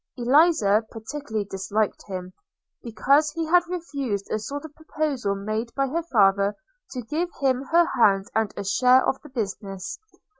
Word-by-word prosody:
Eliza 245 - +4
particularly 225 -2 -5
disliked 200 +2 -2
him, 185 -2 -6 0.5
because 280 +6 +2
he 330 -1 -2
had 350 +3 +5
refused 280 - -3
a 215 - 0
sort 285 +7 -6
of 310 - -11
proposal 295 -9 -2
made 215 +4 -3
by 275 - +1
her 315 +6 -1
father 200 -9 +3 0.3
to 250 -2 -6
give 315 +9 -2
him 260 -2 +1
her 340 +4 +4
hand 195 -9 +3
and 220 -1 0
a 200 - -3
share 250 +6 +4
of 265 - 0
the 300 - -13
business. 200 -5 -5
240 Hz, 155 wpm, -24 LUFS, 200-295 Hz, 0.5 s, had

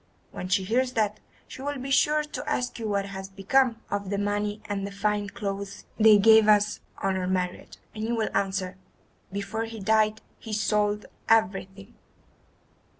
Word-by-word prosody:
When 185 - -6
she 190 +1 +2
hears 250 +6 +1
that, 215 -1 0 0.3
she - - -10
will 285 +1 -3
be 265 +1 -5
sure 300 +2 +3
to 300 - -6
ask 250 -1 -2
you 225 - -3
what 200 -1 0
has 195 -1 -7
become 225 +5 +2
of 200 -1 -2
the 200 - -1
money 205 +1 -1
and 200 -1 -3
the - - -7
fine 205 0 -1
clothes 200 -1 -5 0.2
she 215 -1 +9
gave 220 +1 +6
us 210 0 +4 0.2
on 195 -1 +1
our 185 -1 -2
marriage, 180 -1 -2 0.2
and 215 - -5
you 235 +2 0
will 220 -2 -2
answer, 190 -2 -1 0.5
'before 200 +3 -3
he 225 -1 -8
died 215 +1 +2 0.2
he 220 - -7
sold 210 0 +1 0.2
everything. 195 0 +1
210 Hz, 170 wpm, -27 LUFS, 195-220 Hz, 0.5 s, she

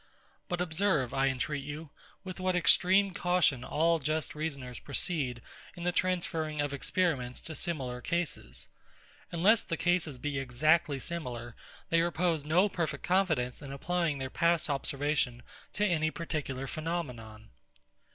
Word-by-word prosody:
But 175 0 -1
observe, 160 -6 +1
I 135 0 +2
entreat 135 +2 -1
you, 150 +1 -7 0.3
with 185 -1 -7
what 185 0 +1
extreme 190 +3 +5
caution 175 -8 +2
all 165 +5 +2
just 155 +2 -1
reasoners 140 -6 -4
proceed 140 -5 -1 0.3
in 175 - -7
the 180 - +2
transferring 170 -4 -1
of 145 -1 0
experiments 145 -3 0
to 160 - -7
similar 135 -8 -3
cases. 135 - -3 0.6
Unless 195 +7 +4
the 165 - -2
cases 175 -6 +1
be 140 +1 -2
exactly 145 +4 +2
similar, 125 -6 -5 0.4
they 165 0 +5
repose 170 -2 +1
no 170 +7 +4
perfect 160 -7 -3
confidence 160 -10 +1
in 140 -2 -7
applying 165 +2 0
their 130 -1 -4
past 170 -2 +2
observation 140 -3 0 0.3
to 210 - +1
any 160 -5 +2
particular 150 -5 -3
phenomenon. 125 -9 -5
155 Hz, 135 wpm, -31 LUFS, 135-175 Hz, 0.6 s, extreme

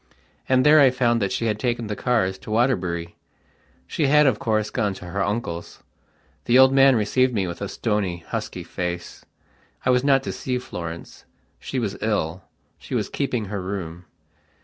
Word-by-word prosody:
And 130 0 +4
there 155 +1 +7
I 140 -2 +7
found 120 -2 +1
that 100 - 0
she 115 - -1
had 105 -2 -1
taken 120 -1 -1
the 105 -1 -4
cars 95 -7 0
to - - -12
Waterbury. 90 -8 0 0.7
She 150 - 0
had, 150 +2 +5
of 130 -6 +2
course, 110 -1 0
gone 105 -5 -1
to 90 - -10
her 100 +3 -2
uncle's. 100 -5 -4 0.6
The 120 - +4
old 130 0 +7
man 135 -1 +6
received 125 +3 +1
me 100 -3 +1
with 85 -1 -6
a 100 - -3
stony, 100 -6 -2
husky - - -4
face. 90 -1 -5 0.6
I 130 - +4
was 125 0 +2
not 135 -1 +3
to - - -3
see 125 -1 -3
Florence; 85 -8 -8 0.3
she - - -5
was - - -2
ill; 80 +4 -1 0.4
she - - -6
was - - -1
keeping 125 -6 -2
her 100 0 -4
room. 90 -2 -6
110 Hz, 180 wpm, -23 LUFS, 95-130 Hz, 0.7 s, there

